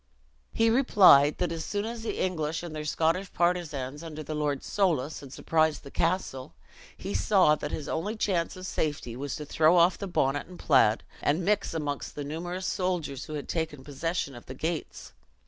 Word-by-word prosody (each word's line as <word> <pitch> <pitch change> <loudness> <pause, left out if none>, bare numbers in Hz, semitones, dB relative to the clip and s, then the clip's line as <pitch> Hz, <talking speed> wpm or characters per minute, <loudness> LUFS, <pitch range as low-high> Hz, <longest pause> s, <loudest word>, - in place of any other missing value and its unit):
He 225 0 +3
replied, 190 - +6
that 175 -2 -1
as 165 -1 -3
soon 205 0 -2
as 230 0 -5
the 225 - -3
English, 165 -3 -1
and 165 -3 -6
their 150 0 -4
Scottish 165 +5 0
partisans 155 -6 -1
under 155 -2 -7
Lord 150 -2 -1
Soulis, 160 -8 0
had 140 -2 -11
surprised 160 +1 +1
the 140 - -11
castle, 165 -7 -1 0.4
he - - -5
saw 180 - +4
that 150 -1 -3
his 150 - -5
only 190 +8 -2
chance 185 -5 -1
of 185 - -8
safety 145 -9 -2
was 140 +2 -4
to 150 - -6
throw 160 +4 +4
off 175 +2 +4
the 200 - -4
bonnet 145 -5 0
and 180 0 -11
plaid, 130 -7 +3 0.2
and 160 +5 +1
mix 205 -4 +1
amongst 145 -3 -3
the 145 - -4
numerous 175 +5 -4
soldiers 175 -8 -2
who 155 - -6
had 145 - -5
taken 160 -5 -3
possession 145 +1 -3
of 120 - -12
the 130 - -7
gates. 160 +4 -4
160 Hz, 185 wpm, -28 LUFS, 145-180 Hz, 0.4 s, replied